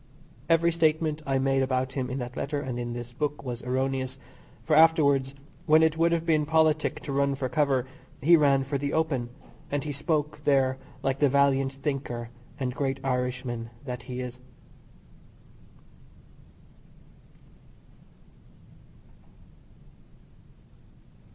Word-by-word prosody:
Every 165 Hz, +1 st, +4 dB
statement 155 Hz, -1 st, +1 dB
I 135 Hz, -1 st, +2 dB
made 135 Hz, 0 st, +2 dB
about 130 Hz, 0 st, 0 dB
him 130 Hz, -2 st, -2 dB
in 130 Hz, -, -3 dB
that 125 Hz, -1 st, -5 dB
letter 145 Hz, +1 st, -2 dB
and 130 Hz, -3 st, -4 dB
in 120 Hz, 0 st, -4 dB
this 120 Hz, 0 st, -7 dB
book 150 Hz, +2 st, -3 dB
was 125 Hz, -2 st, -5 dB
erroneous; 130 Hz, +1 st, -2 dB, 0.5 s
for, 155 Hz, -, +2 dB
afterwards, 140 Hz, -4 st, +4 dB, 0.3 s
when 155 Hz, +1 st, +6 dB
it 160 Hz, 0 st, +3 dB
would 165 Hz, +1 st, +2 dB
have 170 Hz, -1 st, 0 dB
been 155 Hz, -2 st, +3 dB
politic 155 Hz, 0 st, +2 dB
to 140 Hz, -, -6 dB
run 140 Hz, 0 st, +1 dB
for 135 Hz, -1 st, -2 dB
cover, 135 Hz, -1 st, +1 dB, 0.3 s
he 170 Hz, +6 st, +6 dB
ran 140 Hz, -3 st, +4 dB
for 140 Hz, +1 st, -2 dB
the 140 Hz, +1 st, -2 dB
open, 145 Hz, -7 st, 0 dB, 0.4 s
and 145 Hz, -1 st, -1 dB
he 150 Hz, -, -4 dB
spoke 150 Hz, +1 st, -2 dB
there 135 Hz, -2 st, +2 dB, 0.2 s
like 135 Hz, 0 st, 0 dB
the 145 Hz, -, +4 dB
valiant 135 Hz, 0 st, +2 dB
thinker 135 Hz, -4 st, -4 dB, 0.3 s
and 130 Hz, -2 st, -2 dB
great 135 Hz, 0 st, -2 dB
Irishman 125 Hz, -2 st, -2 dB, 0.2 s
that 125 Hz, -2 st, -5 dB
he 125 Hz, 0 st, -6 dB
is. 125 Hz, 0 st, -7 dB
135 Hz, 130 wpm, -27 LUFS, 130-150 Hz, 0.5 s, when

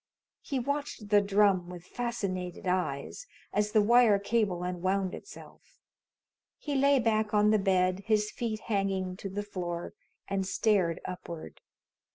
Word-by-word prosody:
He 275 Hz, -, -3 dB
watched 280 Hz, -4 st, -3 dB
the 205 Hz, -1 st, +6 dB
drum 200 Hz, -3 st, +3 dB
with 180 Hz, -1 st, -9 dB
fascinated 195 Hz, -7 st, -4 dB
eyes, 180 Hz, -, -2 dB, 0.3 s
as 210 Hz, 0 st, +1 dB
the 215 Hz, -1 st, +4 dB
wire 235 Hz, -1 st, +6 dB
cable 200 Hz, -3 st, 0 dB
unwound 185 Hz, +1 st, -1 dB
itself. -, -, -12 dB, 0.8 s
He 295 Hz, -, -4 dB
lay 280 Hz, +1 st, +4 dB
back 220 Hz, -3 st, +1 dB
on 210 Hz, 0 st, +5 dB
the 215 Hz, -, +4 dB
bed, 185 Hz, -1 st, +2 dB
his 215 Hz, -1 st, +2 dB
feet 220 Hz, -3 st, -3 dB
hanging 195 Hz, -3 st, -1 dB
to 195 Hz, -, -6 dB
the 205 Hz, +2 st, -3 dB
floor, 175 Hz, -4 st, -5 dB, 0.3 s
and 195 Hz, -1 st, -1 dB
stared 190 Hz, -6 st, +1 dB
upward. 170 Hz, -2 st, -7 dB
200 Hz, 140 wpm, -30 LUFS, 185-220 Hz, 0.8 s, the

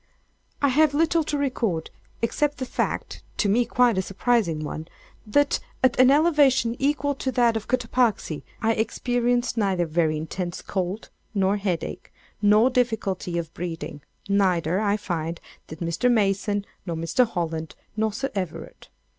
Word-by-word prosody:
] -, -, -40 dB
I 280 Hz, -, +5 dB
have 290 Hz, +2 st, +3 dB
little 330 Hz, +1 st, +3 dB
to 295 Hz, -, -1 dB
record, 230 Hz, -, -1 dB, 0.3 s
except 290 Hz, +5 st, +1 dB
the 260 Hz, -, -3 dB
fact -, -, -3 dB, 0.2 s
(to 210 Hz, -, +2 dB
me 235 Hz, +5 st, +3 dB
quite 235 Hz, -3 st, +3 dB
a -, -, +3 dB
surprising 195 Hz, -5 st, 0 dB
one) 155 Hz, +1 st, -5 dB, 0.4 s
that, 285 Hz, +7 st, +2 dB, 0.2 s
at 255 Hz, -1 st, +3 dB
an 255 Hz, 0 st, +7 dB
elevation 280 Hz, -6 st, +4 dB
equal 285 Hz, 0 st, +1 dB
to 265 Hz, -1 st, -3 dB
that 240 Hz, -2 st, +3 dB
of 220 Hz, -1 st, -3 dB
Cotopaxi, 240 Hz, -, 0 dB, 0.2 s
I 225 Hz, +1 st, +3 dB
experienced 245 Hz, +2 st, 0 dB
neither 190 Hz, -5 st, +1 dB
very 155 Hz, -1 st, +1 dB
intense 175 Hz, +3 st, -4 dB
cold, 190 Hz, +2 st, -3 dB, 0.2 s
nor 195 Hz, +1 st, +2 dB
headache, 185 Hz, -5 st, -3 dB, 0.3 s
nor 210 Hz, +4 st, +5 dB
difficulty 220 Hz, -8 st, -1 dB
of 165 Hz, -1 st, -4 dB
breathing; 165 Hz, -4 st, -5 dB, 0.3 s
neither, 185 Hz, -3 st, +2 dB
I 210 Hz, -1 st, +1 dB
find, 170 Hz, -4 st, -3 dB, 0.3 s
did 160 Hz, +2 st, -10 dB
Mr. 170 Hz, +9 st, +1 dB
Mason, 205 Hz, -2 st, +1 dB, 0.2 s
nor 170 Hz, -3 st, -4 dB
Mr. 165 Hz, +9 st, +2 dB
Holland, 165 Hz, -5 st, -3 dB, 0.2 s
nor 220 Hz, 0 st, +1 dB
Sir 270 Hz, +6 st, -3 dB
Everard. 185 Hz, -5 st, -5 dB
210 Hz, 150 wpm, -25 LUFS, 175-250 Hz, 0.4 s, an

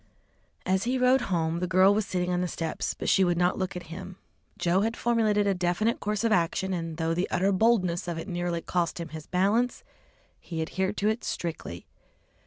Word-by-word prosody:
As 190 Hz, +3 st, +1 dB
he 255 Hz, +2 st, +1 dB
rode 255 Hz, +1 st, +4 dB
home, 165 Hz, -2 st, 0 dB
the 180 Hz, -, -1 dB
girl 185 Hz, +3 st, +5 dB
was 210 Hz, -1 st, 0 dB
sitting 180 Hz, -2 st, -1 dB
on 180 Hz, 0 st, +1 dB
the 180 Hz, -, 0 dB
steps, 165 Hz, -1 st, -3 dB
but -, -, -5 dB
she 195 Hz, -, +4 dB
would 175 Hz, -2 st, +2 dB
not 180 Hz, +2 st, +2 dB
look 185 Hz, -1 st, -2 dB
at 180 Hz, -, -5 dB
him. 185 Hz, +1 st, -8 dB, 0.4 s
Joe 175 Hz, +2 st, +2 dB
had 225 Hz, +2 st, -1 dB
formulated 220 Hz, -3 st, +2 dB
a 200 Hz, -, +3 dB
definite 180 Hz, +5 st, 0 dB
course 210 Hz, 0 st, -2 dB
of 230 Hz, -, +2 dB
action, 190 Hz, +1 st, +1 dB
and 165 Hz, -2 st, -4 dB
though 165 Hz, 0 st, 0 dB
the 180 Hz, +3 st, -1 dB
utter 190 Hz, +2 st, +2 dB
boldness 185 Hz, -4 st, +2 dB
of 170 Hz, -1 st, -3 dB
it 165 Hz, -, -6 dB
nearly 175 Hz, -2 st, -2 dB
cost 175 Hz, -1 st, -1 dB
him 170 Hz, -1 st, -5 dB
his 155 Hz, -1 st, -9 dB
balance, 210 Hz, +7 st, +1 dB, 0.6 s
he 165 Hz, -2 st, -6 dB
adhered 190 Hz, +5 st, -2 dB
to 205 Hz, -, +1 dB
it 220 Hz, +2 st, 0 dB
strictly. 155 Hz, -, -5 dB
185 Hz, 205 wpm, -27 LUFS, 170-205 Hz, 0.6 s, girl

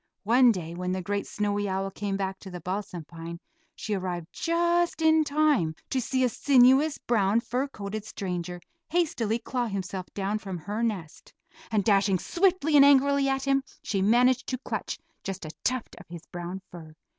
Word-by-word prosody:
One 240 Hz, +3 st, +6 dB
day 170 Hz, -5 st, -4 dB
when 180 Hz, +1 st, -3 dB
the 185 Hz, -, -2 dB
great 200 Hz, +2 st, -2 dB
snowy 205 Hz, -1 st, -1 dB
owl 195 Hz, +1 st, -2 dB
came 195 Hz, 0 st, -3 dB
back 190 Hz, -1 st, -3 dB
to 190 Hz, -, -10 dB
the 180 Hz, -1 st, -7 dB
balsam 180 Hz, -1 st, -4 dB
pine 170 Hz, +1 st, -8 dB, 0.4 s
she 215 Hz, -, -4 dB
arrived 180 Hz, -3 st, -3 dB
just 340 Hz, 0 st, +1 dB
in 320 Hz, -1 st, +4 dB
time 285 Hz, -, +2 dB, 0.2 s
to 260 Hz, -, +1 dB
see 260 Hz, +2 st, 0 dB
a 250 Hz, -, +3 dB
sinuous, 270 Hz, +4 st, +4 dB
brown, 215 Hz, -2 st, +2 dB
fur 250 Hz, +4 st, -2 dB
coated 210 Hz, -4 st, -6 dB
stranger 180 Hz, -4 st, -4 dB, 0.3 s
hastily 250 Hz, -11 st, +1 dB
claw 245 Hz, +1 st, -2 dB
himself 190 Hz, -2 st, -4 dB
down 200 Hz, +2 st, -1 dB
from 195 Hz, -4 st, -5 dB
her 205 Hz, +7 st, -4 dB
nest, 195 Hz, -9 st, -4 dB, 0.4 s
and 215 Hz, -3 st, +1 dB
dashing 195 Hz, -2 st, +3 dB
swiftly 345 Hz, -, +1 dB
and 280 Hz, -, +9 dB
angrily 280 Hz, 0 st, +5 dB
at 270 Hz, 0 st, -1 dB
him, 275 Hz, -1 st, +2 dB, 0.2 s
she 195 Hz, -2 st, -1 dB
managed 245 Hz, +5 st, +3 dB
to 255 Hz, -, -2 dB
clutch 255 Hz, -, -4 dB, 0.3 s
just 190 Hz, -3 st, -5 dB
a 155 Hz, -, -6 dB
tuft 255 Hz, -2 st, -1 dB
of -, -, -14 dB
his 170 Hz, -1 st, -10 dB
brown 175 Hz, +2 st, -6 dB
fur. 160 Hz, -3 st, -11 dB
210 Hz, 180 wpm, -27 LUFS, 185-265 Hz, 0.4 s, and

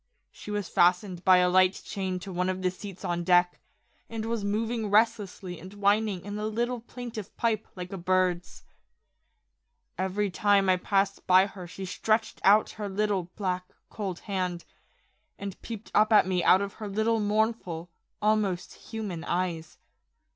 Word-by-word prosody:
She -, -, -11 dB
was 205 Hz, -3 st, -2 dB
fastened 180 Hz, +1 st, +2 dB
by 185 Hz, -1 st, +7 dB
a 180 Hz, 0 st, +4 dB
light 185 Hz, +1 st, +5 dB
chain 190 Hz, -2 st, -3 dB
to 190 Hz, +1 st, -7 dB
one 180 Hz, +1 st, 0 dB
of 185 Hz, 0 st, -3 dB
the 185 Hz, -, +2 dB
seats 195 Hz, 0 st, -9 dB
on 175 Hz, 0 st, -1 dB
deck, 175 Hz, 0 st, +3 dB, 0.5 s
and 225 Hz, -1 st, -4 dB
was 230 Hz, -2 st, -2 dB
moving 220 Hz, +2 st, -1 dB
restlessly 205 Hz, -4 st, +1 dB
and 185 Hz, +3 st, -10 dB
whining 205 Hz, -2 st, +1 dB
in 205 Hz, +1 st, -5 dB
a 215 Hz, -, -2 dB
little 240 Hz, +3 st, -1 dB
plaintive 230 Hz, -3 st, -8 dB
pipe 220 Hz, -2 st, 0 dB
like 180 Hz, +1 st, -7 dB
a 195 Hz, -, -5 dB
bird's. 180 Hz, 0 st, 0 dB, 1.4 s
Every 190 Hz, +2 st, 0 dB
time 200 Hz, +1 st, +3 dB
I 185 Hz, -, +5 dB
passed 195 Hz, +1 st, 0 dB
by 185 Hz, +1 st, +7 dB
her 190 Hz, -3 st, -9 dB
she 190 Hz, +2 st, -7 dB
stretched 215 Hz, +4 st, 0 dB
out 210 Hz, +2 st, +5 dB
her 205 Hz, -, -2 dB
little, 195 Hz, -3 st, -1 dB
black, 180 Hz, -3 st, -3 dB, 0.2 s
cold 195 Hz, -5 st, -4 dB
hand, 180 Hz, -4 st, -3 dB, 0.7 s
and 200 Hz, -1 st, -7 dB
peeped 225 Hz, -2 st, -8 dB
up 215 Hz, +1 st, +4 dB
at 215 Hz, -, +7 dB
me 185 Hz, -1 st, 0 dB
out 190 Hz, +2 st, +5 dB
of 200 Hz, -, -5 dB
her 210 Hz, -, -3 dB
little 220 Hz, +3 st, +1 dB
mournful, 205 Hz, -5 st, -1 dB, 0.3 s
almost 210 Hz, -4 st, +1 dB
human 205 Hz, -7 st, -6 dB
eyes. 170 Hz, -3 st, -2 dB
195 Hz, 160 wpm, -28 LUFS, 180-215 Hz, 1.4 s, by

